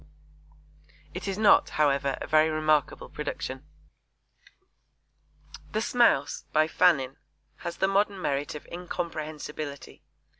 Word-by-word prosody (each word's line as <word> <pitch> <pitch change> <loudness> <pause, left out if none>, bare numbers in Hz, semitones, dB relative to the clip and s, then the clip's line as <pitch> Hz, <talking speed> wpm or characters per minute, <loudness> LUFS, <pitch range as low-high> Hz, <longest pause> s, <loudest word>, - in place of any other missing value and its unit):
It - - -6
is 195 0 -2
not, 215 -1 +5
however, 140 -2 +2
a - - -5
very 155 +1 +4
remarkable 155 -2 +1
production. 135 -2 -5 2.1
The 215 - +1
Smouse, 225 - +2
by 155 0 +3
Fannin, 140 -6 +2 0.4
has 170 0 -6
the 195 - +2
modern 200 0 +1
merit 145 -3 -2
of 150 - -8
incomprehensibility. 155 -5 -6
155 Hz, 105 wpm, -27 LUFS, 145-180 Hz, 2.1 s, not